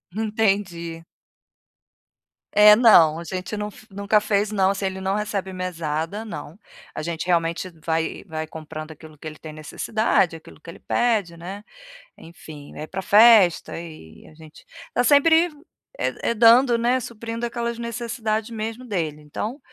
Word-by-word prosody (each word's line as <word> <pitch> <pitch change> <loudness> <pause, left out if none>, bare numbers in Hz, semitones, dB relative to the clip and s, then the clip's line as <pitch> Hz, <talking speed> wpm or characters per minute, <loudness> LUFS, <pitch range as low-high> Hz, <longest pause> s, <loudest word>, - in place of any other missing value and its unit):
Entendi. 195 -6 -1 1.5
É, 210 0 +8
não, 170 -9 +6
a - - -7
gente 185 +4 -5
não 210 0 -4
fe 215 - -16
nunca 200 +2 +2
fez, 210 0 0
não. 195 -1 +2
Se 195 - -6
ele 190 0 -3
não 190 +1 -1
recebe 205 -3 -3
mesada? 170 +2 -4
Não, 190 -3 -8 0.4
a - - -4
gente 170 +1 -4
realmente 170 +1 0 0.2
vai 160 0 -2
vai 160 -2 -5
comprando 155 0 -8
aquilo 155 0 -14
que 155 - -8
ele 155 -1 -8
tem 155 -1 -10
necessidade, 170 +3 0
aquilo 160 - -14
que - - -20
ele - - -11
pede, 210 -8 0
né, 195 +5 -8 0.6
enfim. 155 -3 -12
Vai 155 - -7
pra 190 +3 -5
festa 205 -5 +5
e 155 - -12
a 155 - -17
gente 160 -1 -16 0.3
tá 245 - +2
sempre, 320 +5 +5 0.5
eh - - -1 0.2
eh, - - 0
dando, 235 +2 +6
né, 245 +2 +1
suprindo 230 +1 -5
aquelas 235 0 -4
necessidade 235 -1 -3
mesmo 225 +3 -5
dele. 160 -9 -3
Então, 210 - -5
195 Hz, 155 wpm, -23 LUFS, 165-225 Hz, 1.5 s, É